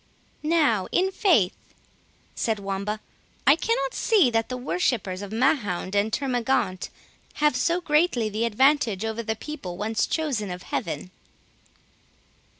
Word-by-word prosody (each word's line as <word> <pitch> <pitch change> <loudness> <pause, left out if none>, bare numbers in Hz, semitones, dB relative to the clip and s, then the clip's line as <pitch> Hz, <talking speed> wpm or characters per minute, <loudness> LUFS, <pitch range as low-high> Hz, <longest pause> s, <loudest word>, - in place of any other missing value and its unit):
"Now, 300 - +2
in 380 +2 +2
faith," 330 - +1 0.6
said 225 -2 -1
Wamba, 200 +2 -3 0.5
"I 280 +4 +7
cannot 295 - -1
see 390 - +3
that 225 -1 0
the 255 - -3
worshippers 245 - -1
of 200 0 -7
Mahound 220 - 0
and 205 +2 +1
Termagaunt 245 -8 0 0.5
have 300 0 +2
so 345 +1 +1
greatly 300 -8 +2
the 215 +2 -1
advantage 235 -3 +2
over 225 +1 -2
the 220 -1 -2
people 220 - -7
once 215 +2 0
chosen 270 - -1
of 180 +1 -6
Heaven." 165 +2 -4
230 Hz, 130 wpm, -25 LUFS, 205-295 Hz, 0.6 s, I